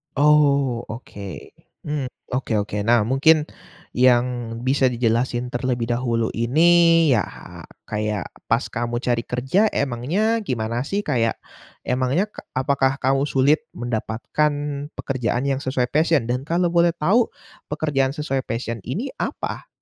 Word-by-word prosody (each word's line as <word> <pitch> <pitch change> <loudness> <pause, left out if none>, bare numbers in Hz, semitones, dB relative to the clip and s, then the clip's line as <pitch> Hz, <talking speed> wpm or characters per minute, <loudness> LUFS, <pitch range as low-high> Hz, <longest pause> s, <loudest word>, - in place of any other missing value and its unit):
Oh 140 -4 +3
oke, 100 -4 -8 0.3
mmm, 150 -3 -2 0.2
oke 125 -2 -2
oke. 105 0 -5
Nah, 115 -1 +4
mungkin 150 +7 +4 0.5
yang 125 -1 +4 0.4
bisa 130 +1 +3
dijelasin 120 0 0
terlebih 120 -1 -2
dahulu 120 -2 0
ini 165 +6 +4
ya 110 -7 +3 0.6
kayak 105 -2 -2 0.2
pas - - +2
kamu 120 +1 -3
cari 120 -2 0
kerja 130 - +1
emangnya 155 - 0
gimana 115 +1 -2
sih? 200 +4 -1
Kayak, 115 -6 0 0.4
emangnya 130 - 0
k - - -11 0.2
apakah 135 0 +1
kamu 135 +2 +2
sulit 145 - +2
mendapatkan 120 +5 -1 0.4
pekerjaan 125 -2 -2
yang 140 -1 0
sesuai 130 -2 -1
passion? 155 -2 +3
Dan 125 +3 -1
kalau 175 +1 +1
boleh 170 0 +3
tahu, 205 +10 +3 0.4
pekerjaan 145 -3 0
sesuai 135 -4 -2
passion 115 0 -3
ini 215 - -3
apa? - - -4
130 Hz, 125 wpm, -22 LUFS, 120-150 Hz, 0.6 s, Nah